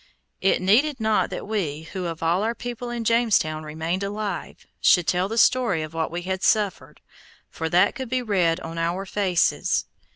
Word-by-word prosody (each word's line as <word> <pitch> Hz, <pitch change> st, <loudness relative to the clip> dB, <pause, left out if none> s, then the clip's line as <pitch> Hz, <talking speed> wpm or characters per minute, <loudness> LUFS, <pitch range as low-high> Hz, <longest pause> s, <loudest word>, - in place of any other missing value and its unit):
It 190 Hz, -1 st, +2 dB
needed 260 Hz, +9 st, +3 dB
not 220 Hz, -1 st, +1 dB
that -, -, -6 dB
we, 165 Hz, -8 st, -2 dB
who 180 Hz, +2 st, -5 dB
of 165 Hz, -1 st, -5 dB
all 170 Hz, +3 st, +2 dB
our 230 Hz, +2 st, -1 dB
people 245 Hz, 0 st, -6 dB
in 240 Hz, -1 st, -3 dB
Jamestown 220 Hz, -9 st, +2 dB
remained 160 Hz, +4 st, -3 dB
alive, 205 Hz, +1 st, -4 dB, 0.2 s
should 180 Hz, -2 st, +5 dB
tell 180 Hz, +2 st, +1 dB
the 225 Hz, +3 st, -4 dB
story 230 Hz, -9 st, +3 dB
of 155 Hz, +1 st, -8 dB
what 160 Hz, -1 st, -1 dB
we 175 Hz, +1 st, -5 dB
had 190 Hz, +1 st, -3 dB
suffered, 210 Hz, -3 st, 0 dB, 0.5 s
for 160 Hz, 0 st, -3 dB
that 175 Hz, +2 st, +4 dB
could 260 Hz, -3 st, -6 dB
be 255 Hz, 0 st, 0 dB
read 185 Hz, -6 st, +1 dB
on 165 Hz, 0 st, -6 dB
our 175 Hz, +4 st, -1 dB
faces. 185 Hz, -3 st, +1 dB
190 Hz, 185 wpm, -24 LUFS, 165-220 Hz, 0.5 s, should